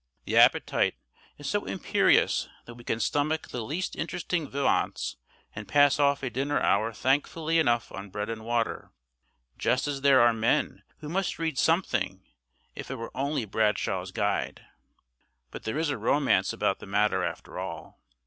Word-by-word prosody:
The -, -, -2 dB
appetite -, -, +4 dB, 0.4 s
is -, -, -7 dB
so -, -, -1 dB
imperious -, -, +2 dB, 0.2 s
that 120 Hz, -, -10 dB
we 120 Hz, 0 st, -13 dB
can 110 Hz, -, -2 dB
stomach 145 Hz, +8 st, 0 dB
the 125 Hz, -, -4 dB
least 160 Hz, +11 st, -3 dB
interesting 170 Hz, -2 st, -3 dB
viands, 140 Hz, 0 st, 0 dB, 0.4 s
and 105 Hz, 0 st, -8 dB
pass 145 Hz, 0 st, +4 dB
off 140 Hz, -1 st, +2 dB
a 130 Hz, -, -2 dB
dinner 140 Hz, +5 st, 0 dB
hour 110 Hz, +3 st, +2 dB
thankfully 155 Hz, +7 st, 0 dB
enough 120 Hz, -6 st, +1 dB
on 100 Hz, +1 st, -8 dB
bread 105 Hz, +2 st, -4 dB
and 115 Hz, -1 st, -5 dB
water; 115 Hz, 0 st, -2 dB, 0.7 s
just 130 Hz, +3 st, +1 dB
as 140 Hz, -2 st, -3 dB
there 135 Hz, -2 st, +6 dB
are 120 Hz, 0 st, +5 dB
men 115 Hz, +1 st, 0 dB, 0.2 s
who 150 Hz, -, -7 dB
must 190 Hz, +2 st, -1 dB
read 160 Hz, -5 st, -2 dB
something, 120 Hz, -, +1 dB, 0.5 s
if -, -, -8 dB
it 135 Hz, -, -3 dB
were 115 Hz, -2 st, -8 dB
only 140 Hz, -2 st, -1 dB
Bradshaw's 105 Hz, +1 st, 0 dB
Guide. -, -, -2 dB, 0.9 s
But -, -, -9 dB
there 110 Hz, +6 st, -2 dB
is 160 Hz, -1 st, 0 dB
a 140 Hz, -, -2 dB
romance 145 Hz, -1 st, +2 dB
about -, -, -1 dB
the -, -, -10 dB
matter 100 Hz, -1 st, +1 dB
after 85 Hz, +1 st, -5 dB
all. 90 Hz, -2 st, -7 dB
130 Hz, 165 wpm, -27 LUFS, 110-145 Hz, 0.9 s, there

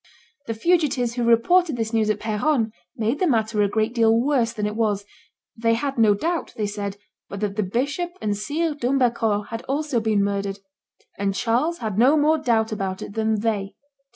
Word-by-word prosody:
The 225 Hz, -, -2 dB
fugitives 275 Hz, -4 st, +1 dB
who 240 Hz, 0 st, -2 dB
reported 275 Hz, +8 st, +3 dB
this 225 Hz, 0 st, -3 dB
news 220 Hz, -1 st, +2 dB
at 210 Hz, -1 st, 0 dB
Peronne 220 Hz, +2 st, 0 dB, 0.3 s
made 230 Hz, +5 st, 0 dB
the 370 Hz, -, +2 dB
matter 220 Hz, -5 st, +1 dB
a 205 Hz, -, +3 dB
great 220 Hz, +2 st, 0 dB
deal 225 Hz, -1 st, +4 dB
worse 250 Hz, -3 st, +1 dB
than 215 Hz, -3 st, -3 dB
it 210 Hz, 0 st, -2 dB
was; 210 Hz, -3 st, 0 dB, 0.5 s
they 230 Hz, 0 st, +2 dB
had 275 Hz, +1 st, -2 dB
no 215 Hz, -2 st, +5 dB
doubt, 335 Hz, -, -2 dB
they 215 Hz, -, 0 dB
said, 205 Hz, -1 st, -4 dB, 0.3 s
but 200 Hz, -, -6 dB
that 205 Hz, -2 st, -2 dB
the 215 Hz, -, 0 dB
bishop 285 Hz, -, -2 dB
and 205 Hz, -1 st, -1 dB
Sire 300 Hz, +10 st, -1 dB
d'Humbercourt 240 Hz, -6 st, 0 dB
had 230 Hz, 0 st, -5 dB
also 285 Hz, -2 st, 0 dB
been 215 Hz, -2 st, +1 dB
murdered; 200 Hz, 0 st, -2 dB, 0.6 s
and 200 Hz, -1 st, 0 dB
Charles 250 Hz, +11 st, 0 dB
had 215 Hz, -1 st, -2 dB
no 270 Hz, +6 st, +5 dB
more 310 Hz, +2 st, +3 dB
doubt 225 Hz, -6 st, +1 dB
about 195 Hz, -3 st, -3 dB
it -, -, -8 dB
than 220 Hz, -1 st, 0 dB
they. 205 Hz, -3 st, -2 dB
225 Hz, 190 wpm, -23 LUFS, 210-270 Hz, 0.6 s, no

